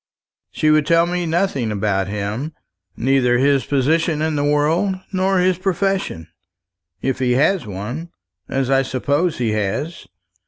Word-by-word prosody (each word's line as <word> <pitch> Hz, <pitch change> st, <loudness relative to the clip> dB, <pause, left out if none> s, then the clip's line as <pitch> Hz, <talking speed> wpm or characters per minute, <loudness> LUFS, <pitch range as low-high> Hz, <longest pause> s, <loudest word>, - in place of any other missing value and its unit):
She 155 Hz, -, +1 dB
would 155 Hz, -1 st, +3 dB
tell 165 Hz, +1 st, +4 dB
me 175 Hz, 0 st, -2 dB
nothing 160 Hz, -, 0 dB
about 100 Hz, -2 st, 0 dB
him 105 Hz, +9 st, -4 dB, 0.4 s
neither 125 Hz, -1 st, +2 dB
his 140 Hz, +1 st, +2 dB
position 155 Hz, +4 st, +1 dB
in 155 Hz, 0 st, 0 dB
the 145 Hz, -, 0 dB
world, 155 Hz, +7 st, +2 dB, 0.2 s
nor 190 Hz, +1 st, +1 dB
his 180 Hz, 0 st, +2 dB
profession, 190 Hz, -, -1 dB, 0.8 s
if 135 Hz, -1 st, -1 dB
he 125 Hz, -1 st, +2 dB
has 140 Hz, -, +2 dB
one, 110 Hz, -, -5 dB, 0.4 s
as 135 Hz, -1 st, -1 dB
I 135 Hz, 0 st, +4 dB
suppose 140 Hz, +6 st, 0 dB
he 120 Hz, -3 st, 0 dB
has. 110 Hz, -, -3 dB
145 Hz, 145 wpm, -20 LUFS, 125-170 Hz, 0.8 s, tell